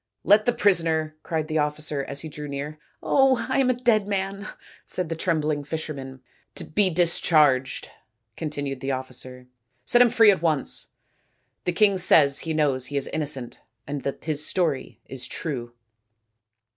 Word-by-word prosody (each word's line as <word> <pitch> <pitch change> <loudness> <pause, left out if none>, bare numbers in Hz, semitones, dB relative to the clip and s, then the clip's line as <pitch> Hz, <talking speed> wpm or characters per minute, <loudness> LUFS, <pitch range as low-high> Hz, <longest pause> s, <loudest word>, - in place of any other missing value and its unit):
" - - -54
Let 210 +1 +6
the 245 - +3
prisoner 165 -8 +1
" - - -49
cried 160 -2 -3
the 155 0 0
officer, 150 -1 0
as 140 +1 -5
he 160 - -7
drew 150 -1 -8
near. 145 +2 -6
" - - -34
Oh, 265 -4 +3
I 260 - 0
am 260 -2 +3
a 255 - +2
dead 235 -4 +2
man," 195 0 -3 0.4
said 180 -3 -3
the 165 - -2
trembling 155 -3 -1
fisherman. 140 -4 -6 0.5
"be 200 +1 +3
discharged," 155 -6 +2 0.5
continued 145 -4 -4
the 135 +1 -2
officer. 130 -1 -6 0.2
" 125 +1 -47
Set 240 - +5
him 245 - +6
free 225 -2 +6
at 190 - -1
once. 155 -5 0 0.8
The 180 - +1
king 200 0 +3
says 145 -6 +5
he 160 - -4
knows 135 -5 0
he 145 - -3
is 140 - +1
innocent, 140 -5 -3 0.2
and 145 0 -4
that 140 - -5
his 155 -2 0
story 145 - -1
is 130 -2 -5
true." 120 -7 -4
155 Hz, 170 wpm, -24 LUFS, 140-185 Hz, 0.8 s, Let